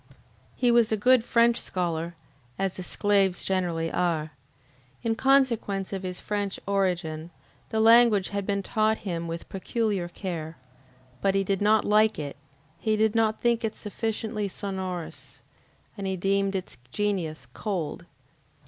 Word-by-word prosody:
He 245 -1 +3
was 235 -2 +4
a 220 - +2
good 250 +2 +5
French 235 0 +3
scholar, 170 -2 -2 0.4
as 195 -1 -1
the - - -4
Sclaves 195 0 +1
generally 175 -4 0
are. 165 -4 0 0.7
In 230 - +1
consequence 230 -7 +2
of 190 - -3
his 180 -1 -5
French 205 -2 -3
origin, 175 -5 -1 0.4
the 220 - -1
language 225 -3 +6
had 200 -1 -3
been 200 -1 0
taught 215 +2 +1
him 170 -3 -3
with 165 0 -5
peculiar 200 -2 -1
care. 170 -3 -5 0.6
But 195 -1 +2
he 195 - +3
did 195 0 -1
not 210 +1 +4
like 215 +1 +4
it, 145 -2 -5 0.4
he 220 -1 +1
did 215 0 +2
not 220 -1 +1
think 235 0 +2
it 220 -1 -2
sufficiently 215 0 -3
sonorous, 190 -3 -6 0.6
and 200 -2 -4
he 190 0 -1
deemed 195 +1 +1
its 185 -7 -5
genius 180 -5 -2
cold. 185 -8 -4
200 Hz, 145 wpm, -27 LUFS, 180-220 Hz, 0.7 s, language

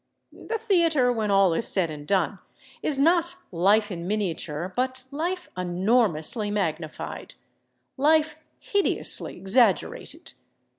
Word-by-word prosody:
The 455 - -5
theater, 335 - +2
when 220 -3 -2
all 195 -3 +4
is 195 - +2
said 175 -5 +3
and 145 -1 -9
done, 190 0 0 0.4
is 290 - +2
not 340 +4 +2 0.2
life 205 +5 +2
in 170 -1 -6
miniature, 180 -4 -3
but 255 +1 -2
life 345 +5 -3
enormously 185 +1 0
magnified, 165 -6 -4 0.6
life 305 +2 +2 0.2
hideously 405 -1 +1
exaggerated. 195 -1 0
210 Hz, 110 wpm, -25 LUFS, 180-300 Hz, 0.6 s, all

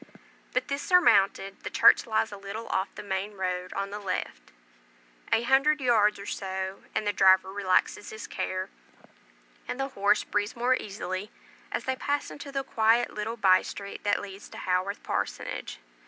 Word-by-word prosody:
But 255 0 0
this 280 0 -2
surmounted, 195 - +3
the - - -5
church - - +5
lies 220 0 +1
a 205 - -7
little 200 +3 -6
off 190 +1 0
the - - -7
main 200 +1 -3
road 180 -1 -3
on 195 0 -3
the 205 - -5
left; 185 - -4 0.8
a 230 - +3
hundred 275 +4 +3
yards, 220 -5 +3
or 200 - -9
so, 190 -1 -4
and - - 0
the 205 - +1
driver 190 0 +5
relaxes 200 +1 +1
his 220 +1 -7
care, 185 +1 -3 1.0
and 250 - -4
the 270 0 -1
horse 210 -4 +2
breathes 205 +1 -2
more 245 +2 +2
easily, 195 -2 -5 0.4
as - - -2
they 260 - 0
pass 285 +2 -2
into 285 -1 -8
the 275 -1 -2
quite 230 -2 +2
little 220 +2 -4
by 185 -4 +5
street 200 0 -7
that 205 0 +1
leads 195 0 -9
to - - -11
Haworth 185 +2 -1
Parsonage. - - -3
205 Hz, 170 wpm, -28 LUFS, 190-235 Hz, 1.0 s, church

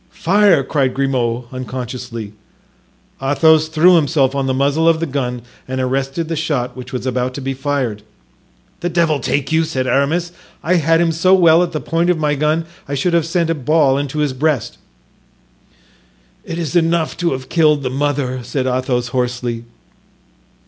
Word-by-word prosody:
"Fire!" 190 -4 +3
cried 135 -2 0
Grimaud, 125 -3 0
unconsciously. 125 -3 -6 0.9
Athos 155 +3 +3
threw 170 +3 +5
himself 145 -4 +2
on 135 -1 -1
the - - +1
muzzle 145 +5 +2
of 165 -1 +2
the 165 - -1
gun 125 -4 -3 0.2
and 130 0 -3
arrested 135 +5 -2
the 165 - -2
shot 140 -6 -2
which 130 0 -9
was 125 -1 -4
about 125 0 -1
to - - -5
be 135 0 -3
fired. 135 -6 -2 0.8
"The 175 - -2
devil 165 -4 +1
take 140 0 -1
you," 160 +1 +3
said 135 -5 -2
Aramis. 155 +7 0 0.3
"I 180 +2 +2
had 165 +1 +3
him 170 -1 +2
so 185 +4 +4
well 170 -2 +5
at 175 -1 -1
the 155 - -3
point 165 +3 0
of 180 - +2
my 150 -2 0
gun 155 +3 0 0.2
I 140 - -3
should 170 +6 0
have 165 -2 +2
sent 165 -1 0
a - - +2
ball 150 -1 +2
into 145 +1 -4
his 150 -3 0
breast." 145 -2 -1 1.6
"It 165 - -6
is 165 -3 -3
enough 165 -1 +1
to 175 -4 0
have 130 0 -6
killed 150 -4 +2
the 130 - -2
mother," 135 -2 -1
said 130 +2 -3
Athos, 125 -1 -1
hoarsely. 125 -2 -2
145 Hz, 175 wpm, -17 LUFS, 130-165 Hz, 1.6 s, threw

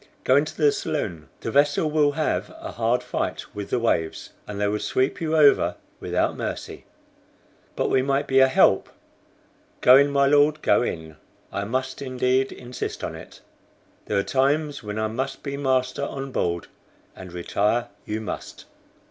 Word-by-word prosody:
Go 130 - +4
into 150 +2 +1
the 150 -3 +4
saloon. 90 - -4
The - - -3
vessel 145 +2 +2
will 150 -2 +3
have 155 +1 -1
a - - -7
hard 120 +2 0
fight - - -3
with 100 -1 -6
the - - +1
waves, 100 -9 -1 0.2
and 100 -1 -6
they 105 - +1
would 105 +1 -1
sweep 130 +5 0
you 160 -1 0
over 145 -2 +5 0.2
without - - 0
mercy." - - -5 0.9
"But - - 0
we 130 - +4
might 140 +2 0
be 135 -1 +3
a 130 - +7
help." 130 - +3 0.9
"Go 130 +1 +8
in, 140 +1 +4
my 140 -1 +3
Lord, 145 +2 +3
go - - +4
in. 80 -9 -4 0.4
I 100 - -2
must 130 +5 -3
indeed 130 0 0
insist 125 +1 -6
on - - -3
it. - - -12 0.7
There 105 - 0
are 100 - +2
times 145 +4 0
when 105 0 -6
I 110 - 0
must 130 +5 -4
be 140 -1 -4
master 130 -1 0
on 135 -1 -5
board, 85 -7 -1 0.5
and 95 -2 -10
retire 105 +6 0
you 110 +1 -4
must." 110 - -7
130 Hz, 170 wpm, -24 LUFS, 110-140 Hz, 0.9 s, Go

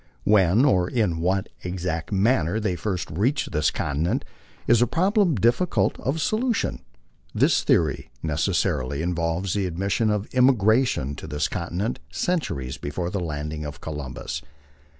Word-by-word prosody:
When 105 - +4
or 90 -9 +3
in 105 -9 0
what 95 +3 0
ex 90 0 -4
act 80 +1 -2
manner 100 -2 +2
they 105 -5 -1
first 90 -2 -3
reached 110 - 0
this 75 -1 +2
continent 75 +4 -1 0.4
is 120 0 +4
a 120 - +4
problem 190 - +2
difficult 120 - +2
of 140 +5 -1
solution. 225 +7 0 0.5
This - - +3
theory - - +1
necessarily 80 -3 0
involves 85 +1 -1
the 100 -2 0
admission 100 +5 0
of 105 0 -1
emigration 120 - +3
to - - -8
this 75 0 -1
conti - - -5
nent 105 +7 -1
centuries 70 - -2
before 85 +5 -3
the 100 - -2
landing 75 -2 -4
of 75 -1 -7
Columbus. 75 -5 -5
95 Hz, 145 wpm, -24 LUFS, 80-115 Hz, 0.5 s, When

